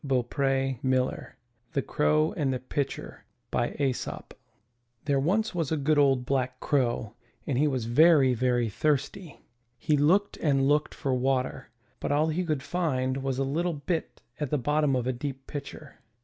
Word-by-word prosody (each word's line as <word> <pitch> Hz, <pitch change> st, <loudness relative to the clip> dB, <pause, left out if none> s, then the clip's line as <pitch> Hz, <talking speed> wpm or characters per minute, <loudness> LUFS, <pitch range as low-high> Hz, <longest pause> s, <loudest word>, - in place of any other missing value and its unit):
129 135 Hz, 0 st, 0 dB
MY 130 Hz, -1 st, +2 dB
BOOK 130 Hz, 0 st, 0 dB
HOUSE -, -, -9 dB, 0.5 s
THE -, -, +1 dB
CROW 75 Hz, +1 st, +1 dB
AND 140 Hz, -4 st, 0 dB
THE 130 Hz, -, -1 dB
PITCHER 130 Hz, +2 st, -4 dB, 0.3 s
Adapted -, -, -1 dB
from 145 Hz, -, +1 dB
Aesop 130 Hz, -2 st, -4 dB, 0.7 s
There 140 Hz, -2 st, +2 dB
was 200 Hz, +10 st, +1 dB
once 165 Hz, -5 st, -2 dB
a 160 Hz, -, +1 dB
good 150 Hz, +1 st, +2 dB
old 135 Hz, -3 st, +3 dB
black 130 Hz, -1 st, -1 dB
Crow 120 Hz, -6 st, 0 dB, 0.3 s
and 140 Hz, -, -1 dB
he 145 Hz, +4 st, +3 dB
was 130 Hz, -5 st, -1 dB
very, 140 Hz, +1 st, +5 dB
very 120 Hz, -1 st, +1 dB
thirsty. 150 Hz, -, -2 dB, 0.4 s
He 155 Hz, -, +1 dB
looked 185 Hz, +8 st, +2 dB
and 135 Hz, -3 st, +2 dB
looked 150 Hz, +1 st, +1 dB
for 135 Hz, -4 st, -1 dB
water, 130 Hz, 0 st, -1 dB, 0.3 s
but -, -, -2 dB
all 150 Hz, +2 st, +2 dB
he 170 Hz, +4 st, -1 dB
could 155 Hz, -6 st, -2 dB
find 130 Hz, -7 st, -1 dB
was 135 Hz, -1 st, -2 dB
a 135 Hz, -, +1 dB
little 165 Hz, +6 st, -1 dB
bit 160 Hz, +3 st, -4 dB, 0.2 s
at 150 Hz, -3 st, -2 dB
the 150 Hz, -, +1 dB
bottom 150 Hz, +1 st, +1 dB
of 125 Hz, -2 st, -1 dB
a 130 Hz, -, 0 dB
deep 135 Hz, +1 st, -6 dB
pitcher. 145 Hz, 0 st, -8 dB
135 Hz, 175 wpm, -27 LUFS, 130-150 Hz, 0.7 s, very